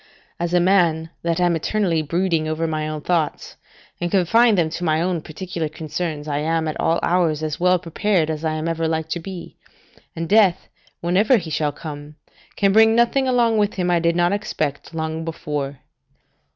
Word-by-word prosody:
As 170 0 -2
a - - +5
man 170 -3 +2
that 170 0 -1
am 175 -1 +2
eternally 170 -1 0
brooding 165 0 0
over 155 +1 -1
my 155 -1 -2
own 155 -1 -4
thoughts, 165 -2 -1 0.4
and 175 - -1
confine 210 +5 +4
them 165 -4 +1
to 175 - -5
my 155 -2 +2
own 175 -1 -1
particular 165 0 -5
concerns, 155 0 -4
I 145 -1 -1
am 160 +1 0
at 155 - -4
all 165 - +2
hours 165 -4 +1
as 155 -1 -3
well 180 +1 +4
prepared 175 -1 0
as 155 0 -5
I 160 -1 0
am 155 +1 -3
ever 165 -1 -1
like 160 0 -2
to 170 - -2
be, 180 0 -9 0.6
and 165 0 -3
death, 195 -3 +3 0.3
whenever 195 +9 +3
he 165 -6 -5
shall 150 -1 0
come, 150 -1 -9 0.4
can 195 -1 +2
bring 220 +1 +6
nothing 240 +3 +2
along 235 -3 +2
with 205 0 +1
him 180 -2 0
I 175 - +3
did 170 0 +1
not 175 +2 +2
expect 165 -7 -3
long 160 0 -3
before. 150 -4 -4
165 Hz, 190 wpm, -21 LUFS, 155-185 Hz, 0.6 s, bring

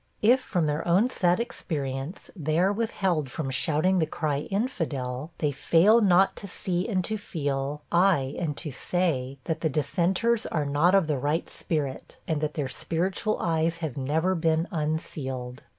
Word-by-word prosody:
If, 245 +5 +6
from 180 -9 -1
their 150 +3 -1
own 195 +9 +3
sad 175 -2 +2
experience, 145 - -4
they 155 -3 -1
are 190 +4 +3
withheld 190 - 0
from 135 0 -4
shouting 160 +7 +2
the 160 - +1
cry 155 -3 -1
of 145 - -5
'infidel,' 155 - -2
they 150 -2 0
fail 180 - +4
not 190 -1 +4
to 200 - -6
see 180 +1 -2
and 185 -5 0
to 220 - -2
feel, 145 -4 -3
ay, 170 -7 +3
and 155 -4 -2
to 155 - -5
say, 140 -3 -1
that 160 +1 -3
the 160 - +1
dissenters 180 - +1
are 155 -3 -1
not 150 +7 +3
of 195 -3 +4
the 150 -3 -1
right 150 +5 0
spirit, 145 -5 -3
and 155 -2 0
that 150 -1 -2
their 145 -4 -1
spiritual 185 - -1
eyes 165 0 +1
have 160 -6 -4
never 155 +7 +1
been 160 0 +1
unsealed. 140 -6 -3
160 Hz, 170 wpm, -27 LUFS, 145-185 Hz, -, If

